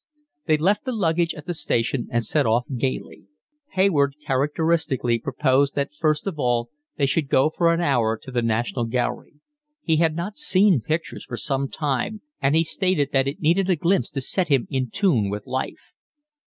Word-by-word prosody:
They 155 -1 +4
left 195 +10 +1
the 260 - -1
luggage 170 -5 +1
at 150 - -10
the 175 - -3
station, 130 -5 -1
and 120 0 +1
set 145 +2 +1
off 115 +2 +2
gaily. 130 +2 -4 0.5
Hayward 155 -8 +2
characteristically 145 -3 +1
proposed 140 +1 +1
that 140 0 -2
first 155 0 0
of 185 -6 -4
all 120 -2 0 0.3
they 140 - +2
should 140 +1 0
go 135 +4 +3
for 170 +1 +2
an 170 +1 +1
hour 120 -8 +1
to 130 - -11
the 125 -1 0
National 115 +1 -1
Gallery; 120 +4 -2 0.5
he 160 -1 +2
had 160 -1 +2
not 175 +5 -4
seen 200 - +3
pictures 155 -7 -3
for 120 - -6
some 135 +5 -1
time, 150 - -2 0.2
and 140 +2 +2
he 165 - +4
stated 165 -4 0
that 135 -1 +3
it 140 - -4
needed 175 +5 +2
a 185 - +4
glimpse 175 +4 +1
to 135 - -4
set 180 +7 -1
him 135 -5 +2
in 130 -3 -1
tune 125 - +1
with 105 +1 -5
life. 130 0 -5
145 Hz, 185 wpm, -23 LUFS, 125-165 Hz, 0.5 s, They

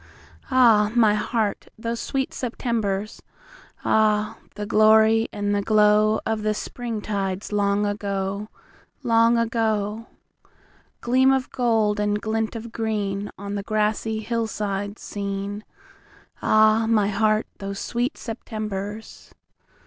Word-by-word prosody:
Ah, 230 -5 +5
my 220 -3 +5
heart, 215 -1 -1
those 230 +1 -3
sweet 270 -1 -2
Septembers! 220 -5 -2 0.6
Ah, 215 -1 +2 0.2
the 210 - -4
glory 220 +1 +5
and 205 0 -1
the 205 - +1
glowOf 215 +1 +3
the 215 0 0
Spring 230 -1 -5
tides 195 -1 -3
long 205 0 +1
ago, 200 0 -3 0.5
Long 230 -1 +4
ago! 225 -1 -1 0.9
Gleam 260 +2 +4
of 265 -1 0
gold, 220 -4 +1
and 210 0 0
glint 220 +1 -2
of 230 +1 -6
greenOn 205 -2 -3
the 200 - -2
grassy 215 +1 -1
hillsides 210 -3 -3
seen, 200 +1 -4 0.8
Ah, 215 +1 +4
my 210 -3 +3
heart, 215 +1 +2
those 195 0 -5
sweet 245 +7 -2
Septembers! 215 -2 -6
215 Hz, 110 wpm, -23 LUFS, 205-225 Hz, 0.9 s, Ah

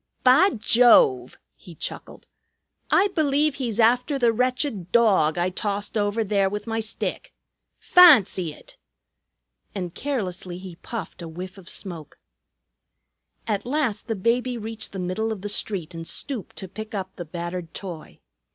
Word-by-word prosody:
"Bah 275 +10 +6
Jove!" 215 - +4 0.2
he 175 - -14
chuckled. - - -7 0.6
"I 405 - +4
believe 300 -3 +1
he's 240 -5 -4
after 250 +5 +3
the 240 -3 +3
wretched 250 - -1
dawg 195 -10 +4
that 175 - 0
I 180 - +1
tossed 205 +3 -3
over 210 +1 0
there 200 -2 +1
with 210 +1 -5
my 225 -1 -2
stick. 220 -1 -4 0.4
Fahncy 225 - +6
it!" - - -15 1.0
And 180 -4 -4
carelessly 185 -10 -4
he 185 -2 -10
puffed 225 -1 -7
a 170 - -6
whiff 180 +4 -8
of 185 - -11
smoke. 165 -7 -7 1.3
At 205 -3 -1
last 255 -6 -1
the 225 - -1
baby 240 +5 0
reached 225 0 -7
the 195 - -7
middle 185 +5 -2
of 210 -4 -5
the 205 - -3
street 185 -5 -2
and 165 0 -7
stooped 260 -8 -5
to 190 - -6
pick 215 +3 -8
up 190 -1 -5
the 175 - -7
battered 170 +1 -6
toy. 175 -5 -8
205 Hz, 150 wpm, -24 LUFS, 180-240 Hz, 1.3 s, Bah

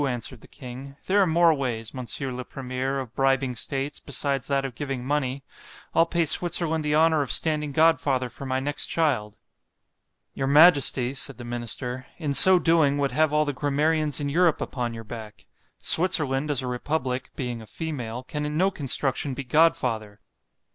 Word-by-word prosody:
answered 120 -1 -5
the - - -15
king—there 140 +9 -3
are 190 - +3
more 170 0 +4
ways, 120 -6 -4
Mons. 130 -2 -4
le 125 -2 -4
Premier, 130 +1 -4
of 125 -3 -7
bribing 135 -1 +1
states, 135 +4 -3
besides 135 -2 -2
that 140 -1 0
of 135 - -5
giving 135 -1 -5
money—I'll 140 +3 -2
pay 170 0 0
Switzerland 160 0 +2
the 150 0 0
honour 160 -1 +3
of 135 - -2
standing 150 -2 +1
godfather 140 -4 +2
for 130 +3 -9
my 130 0 -1
next 145 +2 0
child.——Your 135 -1 -5
majesty, 140 -4 +5
said 135 0 -2
the 120 - -9
minister, 120 +2 -4
in 150 -4 -2
so 185 +7 +7
doing, 165 -5 +2
would 140 -2 0
have 155 +3 +2
all 150 0 +2
the 145 - -2
grammarians 150 +1 0
in 145 - -2
Europe 165 +2 +2
upon 120 -3 -4
your 115 - -8
back;——Switzerland, 135 - -1
as 140 -3 +1
a - - -4
republic, 130 0 -3
being 120 -3 -4
a 110 - -13
female, 125 -7 -5
can 150 +3 -5
in 150 +1 -3
no 190 +3 +2
construction 135 -3 0
be 140 - -5
godfather. 125 -8 +1
140 Hz, 165 wpm, -25 LUFS, 125-155 Hz, -, so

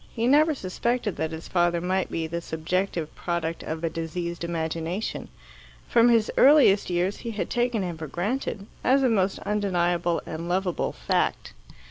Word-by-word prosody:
He 230 -1 0
never 300 +4 +4
suspected 230 +1 -2
that 160 +2 -1
his 160 +1 -7
father 175 -1 +2
might 185 +2 -1
be 165 - -2
the 170 +2 -4
subjective 165 0 -2
product 170 -1 -3
of 160 +1 -5
a 165 - +1
diseased 170 +1 -4
imagination. 165 +3 -3 0.6
From 235 0 +5
his 230 -2 +3
earliest 265 -10 +6
years 180 +3 0
he 235 - -6
had 215 -3 -4
taken 240 -4 +1
him 175 -3 -5
for 160 - -5
granted, 200 - -3 0.2
as 270 +1 +4
a 255 - +4
most 195 -4 +1
undeniable 175 -4 +1
and 165 +2 -5
lovable 180 -1 0
fact. - - -1
180 Hz, 160 wpm, -26 LUFS, 165-215 Hz, 0.6 s, earliest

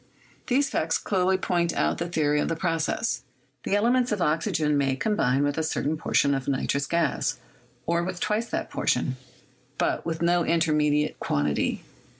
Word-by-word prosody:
These 275 +3 +2
facts 160 +1 +1
clearly 190 -1 +1
point 175 -2 0
out - - 0
the 170 0 -2
theory 150 -3 +1
of - - 0
the 165 - -1
process: 165 +5 -1 0.4
the 200 - 0
elements 240 +4 +2
of 210 - 0
oxygen 155 -2 +1
may 135 -2 +1
combine 135 - +1
with 145 +2 0
a - - 0
certain 155 0 -1
portion 140 -2 +2
of 135 -2 -3
nitrous 140 +1 0
gas, 170 -5 0 0.5
or 170 0 +1
with 185 0 -4
twice 215 +5 0
that - - -3
portion, 130 +1 0 0.6
but - - 0
with 165 0 -3
no 175 0 +3
intermediate 150 -3 +1
quantity. 75 0 -1
165 Hz, 160 wpm, -26 LUFS, 145-180 Hz, 0.6 s, no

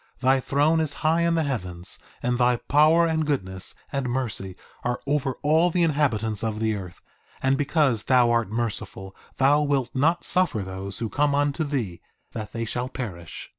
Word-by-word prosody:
Thy 130 +1 +3
throne 145 +5 +2
is 155 -2 -1
high 165 +2 +3
in 170 0 +2
the 165 - +2
heavens, 90 - -4 0.2
and 125 0 0
thy 125 0 +4
power, 155 +7 +4
and 160 -1 +1
goodness, 95 -11 -3 0.2
and 135 -2 -2
mercy 115 -7 -3 0.3
are 120 0 -1
over 140 -2 0
all 160 +4 +4
the 175 0 +1
inhabitants 115 -9 +1
of 110 -1 -2
the 110 0 +1
earth, 95 -4 -8 0.4
and, 135 0 +3
because 140 -5 +1
thou 125 -2 +4
art 115 -4 +1
merciful, 105 -4 -4 0.2
thou 140 +2 +4
wilt 140 -4 0
not 165 +6 +2
suffer 175 - +1
those 95 +1 -5
who 115 - -2
come 145 +5 +1
unto 145 +2 +1
thee 120 - -3 0.3
that 110 -2 -6
they 115 0 -3
shall 120 +3 -3
perish! 90 -12 -6
130 Hz, 175 wpm, -25 LUFS, 110-150 Hz, 0.4 s, thy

